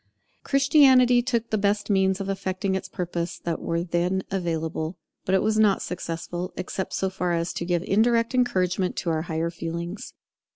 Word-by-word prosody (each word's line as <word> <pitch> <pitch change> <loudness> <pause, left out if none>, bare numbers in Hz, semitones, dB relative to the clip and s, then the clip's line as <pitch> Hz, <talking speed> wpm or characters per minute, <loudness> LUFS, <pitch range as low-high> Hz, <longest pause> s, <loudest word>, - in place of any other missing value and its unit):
Christianity 265 -3 +5
took 235 -2 -2
the 215 - +1
best 205 +1 +1
means 190 0 +2
of 195 - -4
effecting 190 0 -2
its 190 - -3
purpose 175 -2 -3
that 170 -1 -3
were 170 0 -1
then 180 +2 0
available; 165 -2 -2 0.3
but 190 - +2
it 190 - +2
was 215 0 +1
not 210 -3 +3
successful, 175 0 -4
except 185 +1 -4
so 190 - 0
far 180 -2 -2
as 170 0 -1
it 170 - -4
gave 175 -1 0
indirect 230 +4 +2
encouragement 185 -7 +1
to 170 - -1
our 160 -1 0
higher 165 0 -2
feelings. 170 +3 -6
185 Hz, 170 wpm, -25 LUFS, 170-210 Hz, 0.3 s, Christianity